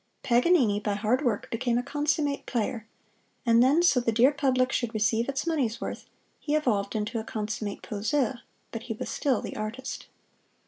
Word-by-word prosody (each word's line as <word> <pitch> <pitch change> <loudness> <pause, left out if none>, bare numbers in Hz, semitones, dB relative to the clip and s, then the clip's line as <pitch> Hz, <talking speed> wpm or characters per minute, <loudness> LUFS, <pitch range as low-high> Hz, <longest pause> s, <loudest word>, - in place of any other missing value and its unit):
Paganini 245 - +3
by 205 -1 -1
hard 225 +7 +1
work 235 -6 0
became 240 +1 0
a 245 - 0
consummate 290 0 -1
player; 225 -1 -2 0.6
and 230 0 +5
then 285 +7 +4
so 280 -7 +5
the 240 -1 0
dear 240 +5 +5
public 260 -3 +1
should 240 -2 -1
receive 220 +3 +1
its 275 +2 -2
money's 270 -9 0
worth, - - -6 0.3
he 295 - -1
evolved 220 -9 0
into 215 +2 -2
a - - -4
consummate 210 -2 -4
poseur 245 +4 -1 0.3
but 230 - -5
he - - 0
was - - -5
still 275 -3 0
the - - -6
Artist. 220 +5 -5
240 Hz, 175 wpm, -27 LUFS, 220-275 Hz, 0.6 s, and